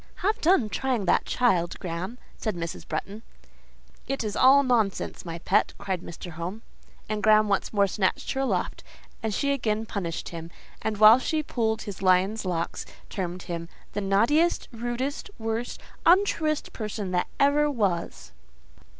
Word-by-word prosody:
"Have 430 +2 +1
done 320 - +4
trying 245 -1 -1
that - - +3
child, 180 -9 +1
Graham," 185 +6 -4 0.2
said 215 -4 -3
Mrs. 170 -1 -5
Bretton. 205 +3 -4 0.9
"It 275 -2 -2
is 210 -2 -3
all 275 +2 +6
nonsense, 225 -9 0
my 165 -1 -5
pet," 170 - +2
cried 190 -3 -3
Mr. 175 +1 -8
Home. 175 +7 -6 0.4
And 215 0 -2
Graham 215 0 +5
once 200 - 0
more 200 -2 +3
snatched 190 0 -1
her 270 - -1
aloft, 270 - -1 0.4
and 220 -2 -1
she 280 +7 +1
again 220 -5 -1
punished 180 -6 -4
him; 165 -1 -7 0.3
and 220 -1 -2
while 215 +3 +9
she 310 +4 -1
pulled 220 -5 -1
his 200 -2 -7
lion's 190 +3 +3
locks, 170 -2 -2 0.3
termed 180 -2 -4
him—"The 170 +4 -6
naughtiest, 230 - +2
rudest, 240 - -3
worst, 225 +1 -3 0.2
untruest 335 -4 +3
person 210 -3 -4
that 180 -1 +1
ever 290 +1 +4
was." 200 -11 -2
215 Hz, 150 wpm, -26 LUFS, 185-255 Hz, 0.9 s, while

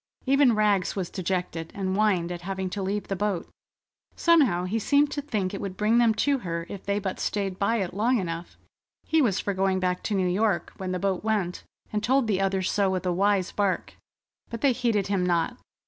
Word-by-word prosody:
Even 270 -3 +4
Rags 210 -3 +2
was 185 -3 -3
dejected, 180 -3 -3
and 190 -1 -1
whined 190 -5 +2
at 175 -1 -5
having 190 0 -4
to 200 - -3
leave 200 +2 -2
the 195 - -2
boat. 195 -2 -1 0.7
Somehow 280 - +4
he 200 +5 -1
seemed 285 +6 +3
to 290 - -2
think 210 -10 -2
it 195 - -4
would 195 -2 -5
bring 220 +3 +3
them 230 -2 +4
to 280 -1 +2
her 170 -5 -4
if 200 - -7
they 200 0 0
but 195 -2 -3
stayed 195 -2 -2
by 200 +3 +2
it 190 -6 -2
long 230 +6 +2
enough. 170 -3 -5 0.5
He 320 0 +2
was 205 -8 +2
for 200 - -1
going 190 0 +1
back 180 -1 -1
to 210 - 0
New 185 -2 +1
York 185 -1 0
when 185 -1 -4
the 185 - -1
boat 190 0 -1
went, 205 -5 -1 0.3
and 210 - 0
told 260 +3 +3
the 200 -3 0
others 190 -1 0
so 200 -2 +2
with 185 0 -2
a 180 - +1
wise 195 0 +1
bark, 200 -3 -1 0.6
but 230 - -6
they 280 - +4
heeded 230 -5 0
him 195 -2 0
not. 170 -2 0
195 Hz, 215 wpm, -26 LUFS, 185-215 Hz, 0.7 s, Even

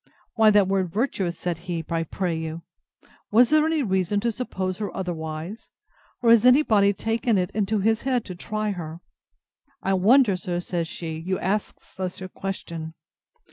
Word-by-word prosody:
Why 220 -1 +5
that 205 -2 +5
word 190 -2 0
virtuous, 195 -6 -1
said 175 -2 -3
he, 165 -2 -2
I 165 -1 -1
pray 170 +1 -2
you? 160 +1 -5 0.7
Was 235 +4 +5
there 310 0 +5
any 320 -3 +1
reason 190 -1 +1
to 235 +1 +1
suppose 190 -6 -4
her 210 - -2
otherwise? 165 +2 -5 0.5
Or 230 - +6
has 230 -2 +6
any 250 +4 +6
body 200 -6 +4
taken 225 +2 0
it 180 -1 0
into 210 0 0
his 220 +2 +2
head 255 -3 0
to 185 - -6
try 215 +4 -3
her?—I 180 - -8
wonder, 210 +3 +5
sir, 175 -1 -3
says 175 -2 -2
she, 160 -1 -6
you 185 +3 -2
ask 200 +3 -2
such 185 -1 -6
a 185 - -6
question! 170 -4 -6
190 Hz, 170 wpm, -24 LUFS, 175-220 Hz, 0.7 s, Or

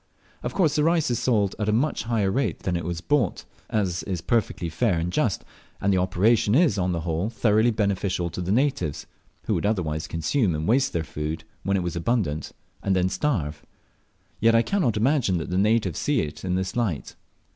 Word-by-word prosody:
Of - - -4
course 165 -7 +2
the 150 - +2
rice 165 -4 +2
is 120 - 0
sold 105 -6 +1
at 105 0 0
a - - +3
much 120 +2 0
higher 110 -5 +1
rate 135 +6 -1
than 90 - -1
it 85 - -2
was 85 0 -3
bought, 145 +6 0 0.2
as 95 -5 0
is 95 -3 -3
perfectly 95 -2 0
fair 90 +3 +1
and 85 +2 -2
just - - 0 0.3
and 100 -1 +2
the 95 - +3
operation 105 +5 +2
is 145 - +3
on 90 0 +1
the 85 -2 -2
whole 85 +5 -1
thoroughly 110 0 +3
beneficial 100 -5 -1
to 90 - -5
the 90 +2 -2
natives, 115 - 0 0.4
who - - -1
would - - -1
otherwise 80 -7 -1
consume 85 - 0
and 75 +2 -3
waste 130 +4 +3
their 85 - 0
food 80 +1 -4 0.2
when 100 +1 0
it 90 - -1
was 85 -1 -3
abundant, 85 -4 -1 0.3
and 95 -1 +1
then 90 0 +2
starve 90 - -1 0.8
yet 115 +1 +4
I 115 - +5
cannot 140 - 0
imagine 120 - +2
that 80 +1 -4
the 90 - 0
natives 105 -5 +2
see 145 -5 +1
it 75 -2 -6
in 90 -1 -1
this 95 0 -2
light. 105 -12 -2
100 Hz, 205 wpm, -25 LUFS, 85-115 Hz, 0.8 s, I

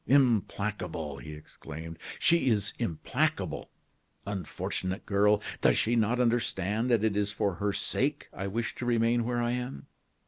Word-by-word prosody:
"Implacable!" 105 - +1
he 75 - -8
exclaimed; 80 +2 -9 0.2
"she 170 -6 +4
is 105 -2 +1
implacable. 85 -10 -1 0.6
Unfortunate 95 -1 -3
girl! 105 +1 +3 0.2
does - - +4
she 115 +2 +2
not 115 +2 +2
understand 115 -2 +1
that 115 -3 +3
it 110 -2 +2
is 105 0 +1
for 105 -2 0
her 100 0 +2
sake 140 +8 -1
I 95 - -4
wish 115 +4 -2
to 125 - -4
remain 115 0 +3
where 120 0 0
I 120 - +1
am? 125 - -4
105 Hz, 145 wpm, -30 LUFS, 95-120 Hz, 0.6 s, she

